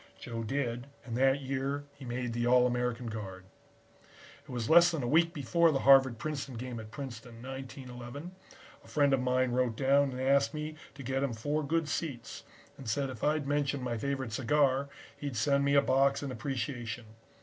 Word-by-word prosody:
"Joe 115 -1 -5
did 120 0 -2 0.2
and 115 -3 -4
that 135 +2 +3
year 135 +1 -2
he 135 - -11
made 120 -1 -3
the 120 +1 0
All 125 0 +6
American 125 -1 -1
guard. 100 -5 -6 1.0
"It - - -22
was 120 -3 -3
less 170 +1 +7
than 160 -6 -2
a - - -1
week 165 +5 +4
before 165 +3 +2
the 135 - 0
Harvard 135 -3 +6
Princeton 140 -1 -4
game 120 0 -5
at 110 -1 -9
Princeton, 115 -2 -8
1911, 130 +2 -7 0.5
a - - -17
friend 145 -2 +3
of 135 - +3
mine 125 0 +1
wrote 125 -2 +1
down 140 +3 +3
and 130 -1 -6
asked 135 -1 +3
me 155 +1 -4 0.2
to 140 - -8
get 130 +2 -1
him 140 -4 0
four 145 +7 -1
good 160 +2 0
seats, 140 -6 -4 0.4
and 130 -4 -6
said 135 +3 0
if 115 - -9
I'd 150 -1 +1
mention 140 -1 0
my 120 -2 -2
favorite 135 0 -2
cigar, 135 +2 +2 0.3
he'd 140 -5 -4
send 140 +5 +2
me 140 0 +3
a 140 - +6
box 135 +2 +3
in 140 - -3
appreciation. 120 -2 -4
130 Hz, 190 wpm, -31 LUFS, 120-140 Hz, 1.0 s, less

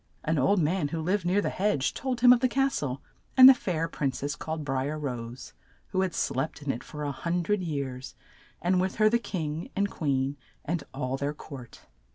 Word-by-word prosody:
An 160 -1 +1
old 195 +9 +3
man 165 0 +1
who 160 +3 -4
lived 180 +3 0
near 185 +3 +2
the - - -1
hedge 185 -9 0
told 255 -3 -3
him 245 0 +9
of 245 - +2
the 255 - +3
cas 270 +2 +1
tle 135 -1 -4 0.3
and 255 0 +12
the 265 - +11
fair 170 -9 -2
prin 140 -3 -1
cess, 140 +3 -4
called 160 -1 -5
Bri 135 0 -1
er 155 - -3
Rose, 125 -4 -6 0.4
who 185 - 0
had 185 -2 -1
slept 145 +3 -2
in 140 - 0
it 120 - -6
for 150 -1 -7
a 145 - -1
hun 170 +5 -2
dred 210 +3 0
years, 140 -6 -4 0.5
and 180 +1 +3
with 190 0 -1
her 215 0 +4
the 235 - +3
king 165 -7 -4
and 200 0 0
queen 140 -2 -1 0.3
and 170 0 -2
all 135 -1 -3
their 145 +2 -2
court. 130 -6 -10
155 Hz, 215 wpm, -28 LUFS, 140-190 Hz, 0.5 s, and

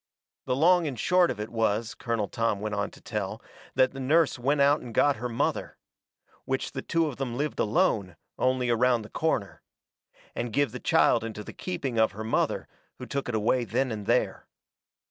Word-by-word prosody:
The 125 - 0
long 175 +3 +4
and 130 -6 -5
short 180 - +4
of - - -3
it 105 - -4
was, 110 -1 0
Colonel 115 -4 -2
Tom 115 -1 -1
went 105 +1 -3
on 100 -1 -1
to - - -17
tell, - - -4 0.4
that 130 0 +4
the 135 - -8
nurse 150 +1 +2
went 140 +4 +1
out 140 +2 +4
and 120 -3 -9
got 145 -4 +4
her 125 +3 -4
mother. 115 - -2 0.7
Which 130 0 -2
the - - -4
two 165 -1 +1
of 145 -5 -4
them 125 -3 -3
lived 150 +1 -2
alone, 100 -3 +1 0.2
only 130 -1 +1
around 120 0 +3
the 105 - -12
corner. 135 -11 -1 0.7
And 120 -1 -3
give 140 +1 +1
the 125 - -6
child 115 - +3
into 110 -2 -6
the - - -9
keeping 140 -10 -3
of 110 -3 +3
her 110 +2 -6
mother, 110 - 0 0.3
who - - -7
took 140 -2 -3
it 120 - -1
away 115 +4 +2
then 120 +4 -1
and 105 -2 -5
there. - - +1
120 Hz, 200 wpm, -27 LUFS, 110-140 Hz, 0.7 s, long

